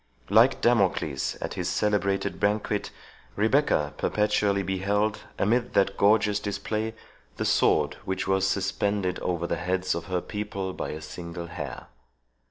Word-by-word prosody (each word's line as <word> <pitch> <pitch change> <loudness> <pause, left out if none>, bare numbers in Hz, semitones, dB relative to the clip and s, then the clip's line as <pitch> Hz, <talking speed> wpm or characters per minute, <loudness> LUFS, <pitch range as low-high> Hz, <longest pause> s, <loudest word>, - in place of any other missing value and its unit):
Like - - +5
Damocles 95 - +1
at - - -3
his 90 0 -2
celebrated 100 0 0
banquet, 105 0 0 0.5
Rebecca 110 - +2
perpetually 105 -1 +1
beheld, 100 +3 0 0.2
amid 120 +4 +1
that 100 0 +3
gorgeous 105 0 +3
display, 105 +2 -3 0.4
the - - -1
sword - - +3
which 95 - -2
was 95 0 +2
suspended 100 -1 0
over 85 -2 -1
the - - -1
heads 90 +1 0
of 85 0 -4
her 90 0 -1
people 100 -2 -4
by - - -4
a 75 - -6
single 85 +2 -7
hair. 85 - -6
100 Hz, 135 wpm, -27 LUFS, 90-105 Hz, 0.5 s, Like